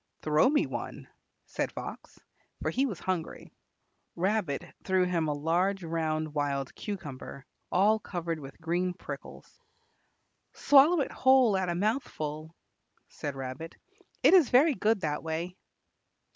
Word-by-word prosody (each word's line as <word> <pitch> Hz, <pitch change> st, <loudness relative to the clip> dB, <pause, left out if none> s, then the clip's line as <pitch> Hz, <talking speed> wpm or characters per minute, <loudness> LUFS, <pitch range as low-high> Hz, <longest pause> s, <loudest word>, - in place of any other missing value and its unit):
"Throw 155 Hz, +9 st, +4 dB
me 295 Hz, +1 st, +2 dB
one," -, -, -6 dB, 0.4 s
said -, -, -3 dB
Fox, -, -, -8 dB, 0.4 s
for -, -, -1 dB
he 270 Hz, +2 st, +1 dB
was 195 Hz, -9 st, -5 dB
hungry. 180 Hz, -4 st, -4 dB, 0.6 s
Rabbit 180 Hz, -4 st, 0 dB, 0.2 s
threw 185 Hz, -1 st, +2 dB
him 170 Hz, -3 st, 0 dB
a 150 Hz, -, 0 dB
large 175 Hz, +6 st, 0 dB
round 155 Hz, -2 st, -2 dB
wild 140 Hz, -2 st, -1 dB
cucumber 145 Hz, -9 st, -7 dB, 0.3 s
all 210 Hz, +4 st, +4 dB
covered 170 Hz, -5 st, -4 dB
with 135 Hz, -2 st, -11 dB
green 175 Hz, +2 st, -1 dB
prickles. -, -, -10 dB, 0.9 s
"Swallow 290 Hz, +4 st, +5 dB
it -, -, -2 dB
whole 260 Hz, -5 st, +4 dB
at 190 Hz, -2 st, 0 dB
a 170 Hz, -, -1 dB
mouthful," 160 Hz, -, -2 dB, 0.5 s
said 145 Hz, -2 st, -5 dB
Rabbit; 135 Hz, +5 st, -6 dB, 0.5 s
"it -, -, +7 dB
is 345 Hz, -9 st, +6 dB
very 280 Hz, +5 st, +5 dB
good 220 Hz, -4 st, +1 dB
that 150 Hz, -3 st, -1 dB
way." 165 Hz, +3 st, -4 dB
175 Hz, 130 wpm, -29 LUFS, 155-210 Hz, 0.9 s, it